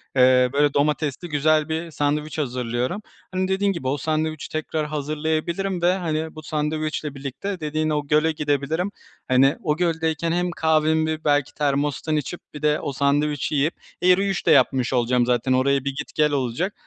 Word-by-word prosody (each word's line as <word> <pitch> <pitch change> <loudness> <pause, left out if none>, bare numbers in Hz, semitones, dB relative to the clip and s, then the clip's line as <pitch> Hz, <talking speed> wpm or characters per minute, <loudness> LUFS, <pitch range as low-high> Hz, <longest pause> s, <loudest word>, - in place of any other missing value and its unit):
eee, 125 -1 +5
böyle 145 0 +3
domatesli 150 +2 0
güzel 155 +1 +2
bir 160 +1 -3
sandviç 150 +1 -1
hazırlıyorum. 125 - -2 0.3
Hani, 185 0 0
dediğin 195 +1 +1
gibi, 170 -9 -4
o 135 +3 0
sandviçi 155 +1 -2
tekrar 155 0 -2
hazırlayabilirim 155 +5 -2
ve, 175 +1 +4
hani, 160 -3 -3
bu 155 - -9
sandviçle 155 -1 -2
birlikte 140 +8 -5
dediğin 155 0 -1
o 150 -1 -1
göle 155 +2 +3
gidebilirim. 150 +4 -1 0.4
Hani, 135 +2 +4
o 150 -1 0
göldeyken 165 -2 0
hem 175 +1 0
kahvemi 160 -1 +1
belki 145 -2 +2
termostan 145 +1 0
içip 150 +4 -3
bir 150 - -8
de 150 0 +2
o 140 - -4
sandviçi 145 +2 0
yiyip 145 +4 +2 0.3
e, 180 - +2
yürüyüş 190 +1 +2
de 165 - +4
yapmış 135 -4 +3
olacağım 125 0 +2
zaten 125 +1 +1
oraya 135 +2 +3
bir 140 -1 -2
git 150 +1 -6
gel 150 -1 +3
olacak. 140 - -1
150 Hz, 165 wpm, -23 LUFS, 140-160 Hz, 0.4 s, eee